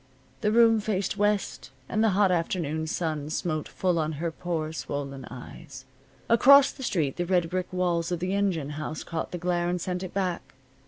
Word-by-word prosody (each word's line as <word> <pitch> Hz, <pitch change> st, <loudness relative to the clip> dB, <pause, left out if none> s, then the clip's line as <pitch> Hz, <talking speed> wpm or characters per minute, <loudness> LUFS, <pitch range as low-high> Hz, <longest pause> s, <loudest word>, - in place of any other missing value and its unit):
The 210 Hz, -2 st, +2 dB
room 225 Hz, 0 st, +5 dB
faced 200 Hz, -3 st, -1 dB
west, 205 Hz, -7 st, 0 dB, 0.2 s
and 215 Hz, -, 0 dB
the 225 Hz, -, +4 dB
hot 200 Hz, -2 st, +4 dB
afternoon 165 Hz, -2 st, -1 dB
sun 155 Hz, -3 st, -2 dB
smote 155 Hz, -1 st, -2 dB
full 180 Hz, -3 st, 0 dB
on 155 Hz, 0 st, -1 dB
her 165 Hz, +3 st, -3 dB
poor 160 Hz, -2 st, -3 dB
swollen 140 Hz, -4 st, -5 dB
eyes. 140 Hz, +3 st, -10 dB, 0.4 s
Across 275 Hz, +4 st, +7 dB
the 275 Hz, -, -12 dB
street 160 Hz, -, -1 dB
the 175 Hz, -, -1 dB
red 175 Hz, -2 st, +1 dB
brick 185 Hz, 0 st, -2 dB
walls 175 Hz, -2 st, 0 dB
of 175 Hz, -, -1 dB
the 185 Hz, +2 st, -2 dB
engine 185 Hz, -8 st, 0 dB
house 155 Hz, +1 st, -5 dB
caught 165 Hz, -1 st, -4 dB
the 180 Hz, -, -5 dB
glare 175 Hz, 0 st, 0 dB
and 180 Hz, 0 st, -1 dB
sent 180 Hz, +1 st, -3 dB
it 185 Hz, -, -5 dB
back. 180 Hz, -7 st, -2 dB
175 Hz, 190 wpm, -27 LUFS, 160-195 Hz, 0.4 s, Across